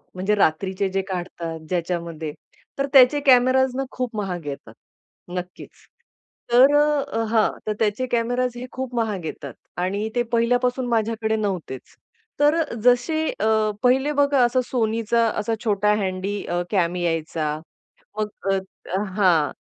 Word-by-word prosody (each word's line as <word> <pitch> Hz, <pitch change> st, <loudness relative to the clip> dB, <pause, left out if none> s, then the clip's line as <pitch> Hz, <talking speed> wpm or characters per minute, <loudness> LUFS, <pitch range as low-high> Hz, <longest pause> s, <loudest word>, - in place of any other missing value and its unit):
म्हणजे 195 Hz, +3 st, +1 dB
रात्रीचे 190 Hz, +2 st, +1 dB
जे 195 Hz, +1 st, -1 dB
काढतात 175 Hz, -3 st, -5 dB
ज्याच्यामध्ये, 170 Hz, -3 st, -3 dB, 0.4 s
तर 275 Hz, -, +1 dB
त्याचे 270 Hz, +2 st, +7 dB
कॅमेराज 260 Hz, 0 st, +5 dB
ना 270 Hz, -, -1 dB
खूप 250 Hz, -3 st, -4 dB
महाग 180 Hz, -5 st, -3 dB
येतात. 140 Hz, -1 st, -7 dB, 0.6 s
नक्कीच. 180 Hz, 0 st, -7 dB, 0.8 s
तर 265 Hz, +4 st, +6 dB
अ, 285 Hz, -5 st, +1 dB
हां. 220 Hz, -1 st, +3 dB, 0.2 s
तर 215 Hz, -, +1 dB
त्याचे 220 Hz, +3 st, 0 dB
कॅमेराज 245 Hz, +1 st, 0 dB
हे 245 Hz, -, -6 dB
खूप 255 Hz, -1 st, -5 dB
महाग 215 Hz, -7 st, -1 dB
येतात -, -, -6 dB, 0.2 s
आणि 200 Hz, +5 st, -1 dB
ते 240 Hz, -, +2 dB
पहिल्यापासून 245 Hz, +2 st, +1 dB
माझ्याकडे 220 Hz, -1 st, 0 dB
नव्हतेच. 185 Hz, -, -4 dB, 0.4 s
तर 295 Hz, +3 st, +4 dB, 0.2 s
जसे 285 Hz, +6 st, +3 dB
अ, 220 Hz, 0 st, +2 dB
पहिले 265 Hz, +4 st, +3 dB
बघा 285 Hz, -2 st, +3 dB
असा 245 Hz, +2 st, +1 dB
SONYचा 230 Hz, -1 st, +1 dB
असा 225 Hz, +2 st, -1 dB
छोटा 210 Hz, -1 st, +2 dB
हँडी 190 Hz, +2 st, -3 dB
अ, 175 Hz, 0 st, -1 dB
कॅम 180 Hz, -4 st, +1 dB
यायचा. 165 Hz, -3 st, -2 dB, 0.6 s
मग 215 Hz, -, 0 dB, 0.9 s
हां. 165 Hz, -8 st, +3 dB
220 Hz, 130 wpm, -23 LUFS, 185-250 Hz, 0.9 s, त्याचे